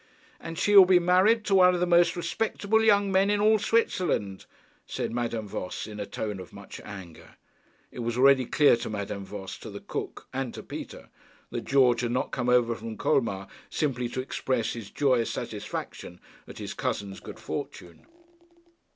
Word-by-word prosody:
'And 165 0 -7
she 205 - +2
will 195 -2 +11
be 185 -1 +6
married 185 +6 +3
to 200 - 0
one 180 -1 +6
of - - -1
the 180 - +2
most 175 0 +4
respectable 210 +5 0
young 200 -2 +4
men 195 +1 +3
in 205 0 +2
all 215 +1 +4
Switzerland,' 180 - 0 0.4
said - - -3
Madame 115 -2 -3
Voss 90 -2 -5
in 105 -1 -9
a 100 - -4
tone 105 -3 -4
of 90 - -10
much - - -10
anger. 95 -6 -11 0.6
It - - -10
was 120 0 -2
already 135 0 +5
quite - - -19
clear 145 -5 +5
to 115 - -5
Madame 100 -1 -4
Voss, 95 -1 -8
to - - -9
the - - -8
cook, - - -6
and 130 -2 -3
to - - -8
Peter, - - -9 0.4
that - - -4
George 125 -4 +4
had 120 - -1
not 125 +2 -1
come 125 -1 -1
over 120 -1 +3
from 115 -1 -7
Colmar 100 -7 0 0.2
simply 125 -6 -1
to 130 - -3
express 130 -2 -2
his 115 -4 -8
joyous 130 -5 +1
satisfaction 90 - -6 0.3
at - - -11
his - - -6
cousin's 100 -1 -3
good - - -10
fortune. 85 -1 -7
125 Hz, 185 wpm, -27 LUFS, 110-180 Hz, 0.6 s, will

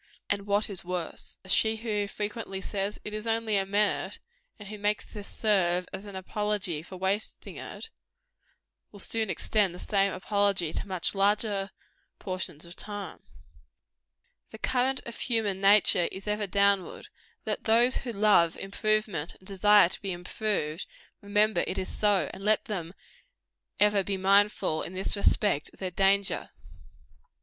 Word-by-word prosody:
And 200 0 -1
what 205 +1 +1
is 195 -4 -6
worse, 175 -1 -5
she 220 +4 +3
who 210 -2 -2
frequently 210 -1 -5
says, 200 +1 -3
It 210 - -6
is 215 +1 -5
only 225 -1 0
a 195 -1 +1
minute 205 +1 +1 0.4
and 205 - -10
who 210 -1 -7
makes 210 +1 0
this 205 -2 -9
serve 180 -4 +1
as 195 +2 -6
an 200 - -8
apology 190 -3 -2
for 185 +3 -10
wasting 190 +3 -3
it - - -8 1.0
will 205 - -12
soon 220 +2 0
extend 200 -4 +1
the - - -10
same 200 -1 +1
apology 195 -3 0
to - - -4
much 185 -3 -1
larger 200 0 +2 0.5
portions 185 -4 -4
of 170 +1 -11
time. 205 -1 -6 1.3
The - - -10
current 260 +1 0
of 235 - -7
human 215 -6 +1
nature 195 -3 +5
is 195 +2 -8
ever 210 0 0
downward: 200 0 +1 0.4
let - - -2
those 235 +3 +4
who 245 - -4
love 200 -6 +4
improvement 205 -4 -1
and 185 - -21
desire 205 -1 +5
to - - -4
be 195 - -3
improved, 180 -2 -3 0.3
remember 210 +1 +2
it - - -3
is 190 - -4
so; 205 -2 +2
and 195 - -9
let 215 +1 +3
them 180 -4 -5 0.8
ever 205 -1 +4
be 195 0 -2
mindful, 195 -4 +3
in 185 - -6
this 190 +3 -1
respect, 200 -5 +1
of - - -21
their 185 -1 -3
danger. 195 +2 +2
200 Hz, 155 wpm, -28 LUFS, 190-210 Hz, 1.3 s, nature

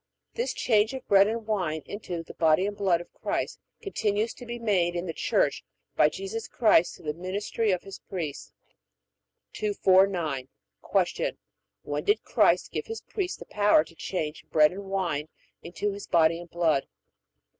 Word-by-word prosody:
This 475 +1 -1
change 220 +1 +2
of 260 - -8
bread 200 0 +6
and 225 0 -3
wine 180 -8 -1
into 180 -5 -5
the - - -11
body 160 +3 +3
and 205 0 -3
blood 190 -4 +2
of - - -14
Christ - - -3 0.2
continues 220 - 0
to 245 - -11
be 240 0 -4
made 190 -7 +1
in 175 +1 -2
the 165 - -4
Church - - +1 0.3
by - - +5
Jesus 395 +4 -5
Christ 210 -7 +3
through - - -16
the 165 - -17
ministry 205 +4 -2
of 185 -2 +1
His 195 - -9
priests. 165 -7 -6 1.0
249. 185 -9 +2 0.6
Q. - - -3 0.5
When - - -3
did 415 +2 +2
Christ - - +3
give - - -4
His 450 0 -5
priests 385 -4 -3
the - - -10
power 205 -6 +4
to 160 - -17
change 160 -3 -4
bread 150 -1 +5
and 195 +2 -7
wine 180 -6 -2 0.3
into 180 +4 -3
His 200 0 -8
body 165 0 +3
and 175 0 -10
blood? 165 -5 +1
195 Hz, 165 wpm, -27 LUFS, 170-215 Hz, 1.0 s, bread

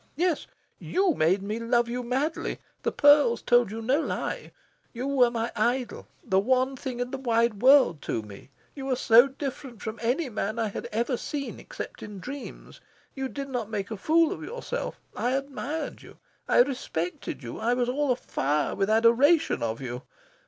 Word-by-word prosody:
Yes, 345 -1 0 0.3
you 375 -2 +1
made 185 - +2
me 210 +3 -3
love 235 +1 +2
you 245 +1 -3
madly. 265 +6 -2 0.2
The - - 0
pearls 290 -5 +5
told 240 -3 +4
you 225 +2 -6
no 260 +6 +2
lie. - - -4 0.4
You 245 +1 -4
were 270 -3 +4
my 230 0 -2
idol 240 +3 -1 0.2
the 190 - +2
one 255 +5 +2
thing 255 -2 -5
in 245 0 -2
the 270 - -4
wide 230 -4 +1
world 255 - +6
to 110 - -2
me. 105 +4 -12 0.2
You 270 -2 -6
were 260 - +1
so 240 +1 +6
different 270 -3 -6
from 220 +1 -6
any 255 +7 0
man 215 -1 -3
I 225 -2 0
had - - -6
ever 235 +3 0
seen 280 +2 -5
except - - -8
in 205 -2 -8
dreams. 275 +7 -9 0.3
You 270 -1 -3
did 275 0 -6
not 240 -5 -3
make 210 -1 -4
a - - -2
fool 320 - +3
of - - -5
yourself. - - -5 0.2
I 245 - 0
admired 275 +3 -4
you. - - -15 0.3
I - - +6
respected 180 - -4
you. 120 - -6
I 235 +3 +1
was 245 -1 0
all 275 +2 +1
afire 150 - 0
with 195 +1 0
adoration 235 +9 +4
of 115 +1 -2
you. 125 -1 -5
245 Hz, 180 wpm, -27 LUFS, 220-275 Hz, 0.4 s, world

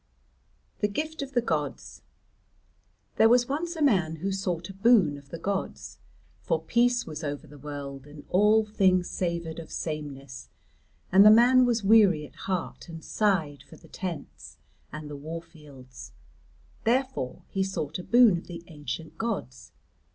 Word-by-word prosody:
THE 210 - +2
GIFT 310 +10 -4
OF 275 0 -6
THE 240 -2 +2
GODS 150 - -3 1.2
There 225 - +6
was 245 0 +4
once 335 +5 -3
a 315 - -1
man 180 - +2
who 190 +5 -3
sought 180 -3 -3
a - - -12
boon 195 -7 +4
of 140 -1 -14
the 165 - -6
gods. 195 +2 -4 0.4
For 165 -2 0
peace 240 +8 +1
was 155 0 -7
over 145 +1 -4
the 145 -1 -14
world 140 -1 -7
and 145 0 -13
all 210 +3 +4
things 190 -4 +2
savoured 170 -2 -3
of 165 - -9
sameness, 140 -4 -6 0.6
and 195 +2 +8
the 210 - +9
man 245 +3 +6
was 235 -3 0
weary 195 -7 +5
at - - -15
heart 185 -2 -4
and 165 -1 -9
sighed 165 -10 0
for 145 - -15
the - - -18
tents 175 -6 -7 0.3
and 155 0 -7
the 150 - -7
warfields. 150 -4 -10 0.7
Therefore 250 - -1
he 195 - 0
sought 155 -5 -4
a - - -6
boon 235 -6 +5
of - - -16
the 170 -1 -8
ancient 150 0 -7
gods. 220 - -4
175 Hz, 160 wpm, -27 LUFS, 150-220 Hz, 1.2 s, the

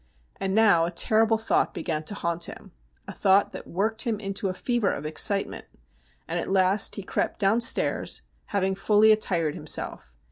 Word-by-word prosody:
And 195 0 -2
now 205 -7 +4
a - - -2
terrible 220 +5 +2
thought 220 - 0
began 155 -2 -3
to 205 - -4
haunt 170 -2 -2
him— - - -11 0.4
a - - -7
thought 195 +1 +3
that - - -9
worked 220 +5 -1
him 230 -5 -2
into 195 -1 -3
a - - -3
fever 240 -1 0
of 145 - -6
ex 155 0 0
citement 200 -1 0 0.3
— 60 0 -37
and 170 +1 -2
at - - -5
last 190 +1 +2
he 200 - -6
crept - - -2
downstairs, 220 +3 +1 0.2
having 195 -2 0
f 195 - -12
ally 215 +1 +6
attired 175 -8 +2
himself. 65 - -4
195 Hz, 185 wpm, -25 LUFS, 170-215 Hz, 0.4 s, ally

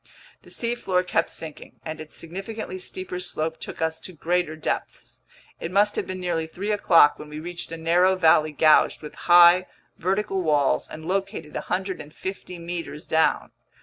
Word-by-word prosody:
The - - -17
seafloor 230 -6 0
kept 170 -2 0
sinking, 160 -2 -9
and 155 0 -5
its 155 - -10
significantly 190 +3 -6
steeper 185 0 -6
slope 160 -2 -3
took - - -5
us 160 0 -1
to 185 - -9
greater 170 0 -1
depths. 155 - -5 0.4
It 165 - -4
must 205 +2 +3
have - - -2
been 185 0 -5
nearly 170 -3 -1
three 195 +6 -4
o'clock 170 -7 +5
when 150 - -9
we 150 0 -7
reached 175 +1 -6
a 165 - -5
narrow 175 +3 +3
valley 160 -3 +4
gouged 155 +1 +4
between 150 - -10
high, 175 +1 +8 0.3
vertical 195 +1 0
walls 150 -5 +2
and 155 0 -9
located 195 -4 -3
150 185 0 -5
meters 170 -3 -6
down. 160 0 +1
175 Hz, 160 wpm, -24 LUFS, 160-185 Hz, 0.4 s, high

